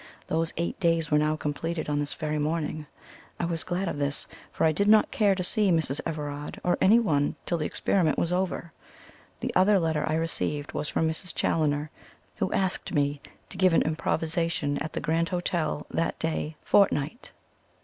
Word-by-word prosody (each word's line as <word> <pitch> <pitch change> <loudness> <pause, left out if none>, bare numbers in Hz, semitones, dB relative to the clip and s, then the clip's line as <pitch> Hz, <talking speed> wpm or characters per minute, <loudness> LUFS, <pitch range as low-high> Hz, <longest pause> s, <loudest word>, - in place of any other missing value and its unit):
Those 165 0 0
eight 170 +1 -2
days 165 -3 +1
were 150 - +5
now 155 +1 +2
completed 155 +2 -3
on 145 -1 0
this 145 0 -3
very 155 -1 -2
morning. 155 0 -2 0.5
I - - 0
was 165 -1 -3
glad 185 +2 -2
of 145 - -3
this; 140 0 -1 0.2
for - - +1
I 160 - +5
did 200 +7 +1
not 215 0 +5
care 205 -3 +3
to 185 - -2
see 205 +2 +2
Mrs. 160 -5 +1
Everard 145 -1 -5
or 180 - +2
anyone 190 -10 +4
till 170 - -1
the 155 - -1
experiment 170 -6 +1
was 170 +1 0
over. 180 -3 -2 0.7
The - - -2
other 195 +2 +5
letter 160 -4 0
I 155 - +1
received 150 -2 -2
was 150 0 -3
from 160 - +1
Mrs. 160 +3 -4
Challoner, 150 -1 0 0.5
who - - -1
asked 190 -1 0
me 145 -2 0 0.3
to - - -7
give 185 -2 +5
an - - +4
"Improvisation" 160 -1 -1
at 160 - -4
the - - -3
Grand 165 +2 +1
Hotel 170 -4 -1
that 165 - -1
day 160 -1 -2
fortnight. 195 - +2
160 Hz, 180 wpm, -27 LUFS, 150-175 Hz, 0.7 s, were